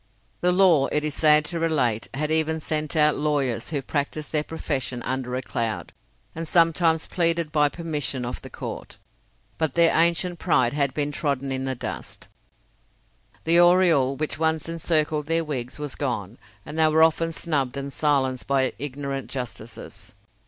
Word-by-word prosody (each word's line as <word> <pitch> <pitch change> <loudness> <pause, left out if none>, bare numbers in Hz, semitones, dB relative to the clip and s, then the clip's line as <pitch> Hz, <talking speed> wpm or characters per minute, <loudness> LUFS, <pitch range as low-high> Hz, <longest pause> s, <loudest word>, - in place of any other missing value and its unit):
The 180 - +2
law, 180 -7 +4
it 150 - -1
is 150 -1 -2
sad 150 0 +5
to 170 +2 -3
relate, 135 -9 +1
had 150 +2 -2
even 160 0 +1
sent 155 0 -3
out 150 -1 +4
lawyers, 140 -6 -1
who 145 -3 -2
practised 150 +2 -3
their 150 - +2
profession 135 -6 -3
under 130 -1 -3
a 130 - -3
cloud, 115 -3 -3 0.4
and 165 0 -5
sometimes 165 -1 +3
pleaded 170 -2 0
by 150 -2 +3
permission 145 -6 -3
of 120 - -5
the - - -10
court. - - -7 0.6
But 160 -4 0
their 170 -1 +4
ancient 170 +1 +2
pride 130 -8 +2
had 140 -2 0
been 145 -1 -1
trodden 140 -3 -2
in 130 0 -2
the 130 0 -2
dust; - - -7 1.1
the 170 +1 +4
aureole 175 -7 +5
which 155 +2 -3
once 160 -1 0
encircled 155 -3 0
their 165 +1 +1
wigs 130 -5 -4
was 150 -2 -5
gone, 120 -6 -4 0.3
and 160 - -6
they 160 - +5
were 160 +1 +4
often 165 +1 +2
snubbed 140 -6 -2
and 140 0 -5
silenced 130 -2 0
by 135 -2 +1
ignorant 140 -1 -4
justices. 120 -3 -7
150 Hz, 165 wpm, -24 LUFS, 135-160 Hz, 1.1 s, sad